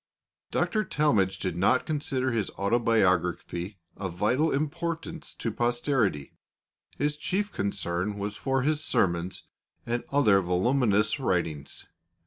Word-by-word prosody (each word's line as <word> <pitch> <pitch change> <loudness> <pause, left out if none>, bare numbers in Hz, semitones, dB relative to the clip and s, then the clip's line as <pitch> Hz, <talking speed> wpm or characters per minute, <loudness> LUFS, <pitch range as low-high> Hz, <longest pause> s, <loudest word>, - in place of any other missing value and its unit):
Dr. 215 -1 +1
Talmage 110 - +2
did 95 -2 -3
not 100 +8 +3
consider 135 -4 -1
his 110 -4 -1
autobiography 95 -4 +1 0.2
of 95 -3 -5
vital 125 - +2
importance 165 +2 -3
to 115 - -3
posterity; 120 - 0 0.6
his 150 +2 0
chief 195 +7 -1
concern 95 0 -2
was 105 +1 -3
for 135 +2 0
his 155 +2 +1
sermons 90 - 0 0.4
and 120 0 -1
other 110 -9 +5
voluminous 105 +5 +2
writings. 85 - -2
115 Hz, 115 wpm, -28 LUFS, 95-145 Hz, 0.6 s, other